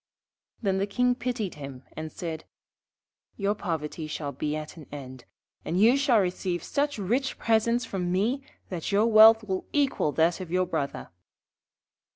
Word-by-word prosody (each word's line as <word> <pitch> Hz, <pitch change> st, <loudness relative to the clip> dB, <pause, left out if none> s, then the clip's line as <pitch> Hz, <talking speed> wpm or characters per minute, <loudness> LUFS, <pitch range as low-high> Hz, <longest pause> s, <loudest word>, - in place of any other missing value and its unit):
Then 190 Hz, -2 st, +1 dB
the 200 Hz, -, 0 dB
King 250 Hz, +4 st, +2 dB
pitied 245 Hz, -6 st, -3 dB
him 135 Hz, -2 st, -8 dB
and 155 Hz, 0 st, -5 dB
said: 160 Hz, -2 st, -6 dB, 0.9 s
'Your 200 Hz, 0 st, +1 dB
poverty 160 Hz, -5 st, -4 dB
shall 150 Hz, -1 st, -4 dB
be 150 Hz, +1 st, -3 dB
at 155 Hz, 0 st, -6 dB
an 155 Hz, -4 st, -12 dB
end, 130 Hz, -3 st, -9 dB, 0.4 s
and 175 Hz, -, -1 dB
you 230 Hz, +5 st, +6 dB
shall 275 Hz, -5 st, +4 dB
receive 180 Hz, -2 st, -1 dB
such 285 Hz, -1 st, -1 dB
rich 240 Hz, +7 st, -1 dB
presents 230 Hz, +2 st, +2 dB
from 180 Hz, -5 st, -3 dB
me 220 Hz, +9 st, +1 dB, 0.3 s
that 175 Hz, -1 st, -4 dB
your 205 Hz, +2 st, +4 dB
wealth 220 Hz, 0 st, +8 dB
will 190 Hz, -3 st, -3 dB
equal 275 Hz, -, +1 dB
that 165 Hz, +3 st, +2 dB
of 185 Hz, -3 st, -6 dB
your 185 Hz, +1 st, +1 dB
Brother.' 140 Hz, -5 st, -3 dB
190 Hz, 160 wpm, -27 LUFS, 160-225 Hz, 0.9 s, wealth